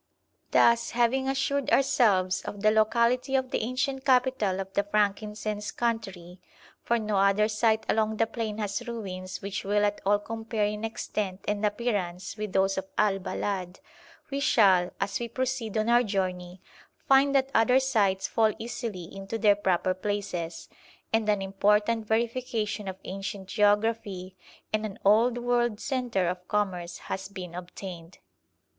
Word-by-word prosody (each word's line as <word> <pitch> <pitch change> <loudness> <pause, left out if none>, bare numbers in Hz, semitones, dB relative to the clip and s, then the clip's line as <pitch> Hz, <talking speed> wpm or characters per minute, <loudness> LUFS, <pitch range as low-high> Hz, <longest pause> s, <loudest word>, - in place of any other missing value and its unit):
Thus, 235 0 +4
having 260 +3 +2
assured 270 0 0
ourselves 210 -10 +3
of 205 - -7
the 215 - +5
locality 235 +4 +2
of 260 -1 0
the - - 0
ancient 260 +3 -2
capital 250 -7 +2
of 195 0 -6
the - - +3
frankincense 210 0 -1
country 195 -7 -3 0.4
for 235 - +1
no 215 -2 -1
other 200 +2 +4
site 220 0 +1
along 220 0 +1
the 225 - +3
plain 225 -2 -4
has 210 +3 -3
ruins 185 -6 -6
which 195 0 -4
will 205 +1 +2
at 205 0 -1
all 205 +1 +3
compare 225 0 -3
in 210 +1 -3
extent 210 -3 -4
and 205 0 -1
appearance 205 -5 -2
with 215 -2 -4
those 195 0 +2
of 190 - -8
Al 205 -2 +2
Balad 185 -1 -3 0.5
we 275 - -1
shall, 190 -9 +4
as 195 0 -1
we 235 - -3
proceed 245 -2 -2
on 215 +1 +1
our 240 +1 +5
journey, 185 -4 -3 0.4
find 275 +1 +5
that 270 0 +2
other 250 +3 +5
sites 205 -8 +1
fall 220 -2 +2
easily 230 -5 -5
into 195 +5 -6
their 210 -2 +5
proper 185 -2 +1
places, 185 -3 -4 0.5
and 225 -1 +2
an 205 -2 +2
important 210 +3 +1
verification 225 -2 -1
of 190 -1 -5
ancient 195 0 -6
geography 205 -2 +1 0.4
and 215 0 +1
an 210 -3 -5
old 230 +4 +4
world 240 -2 0
centre 245 -9 -1
of 180 +1 -4
commerce 180 -4 -2
has 190 0 -4
been 185 -3 -8
obtained. 180 -1 -8
210 Hz, 150 wpm, -27 LUFS, 195-235 Hz, 0.5 s, the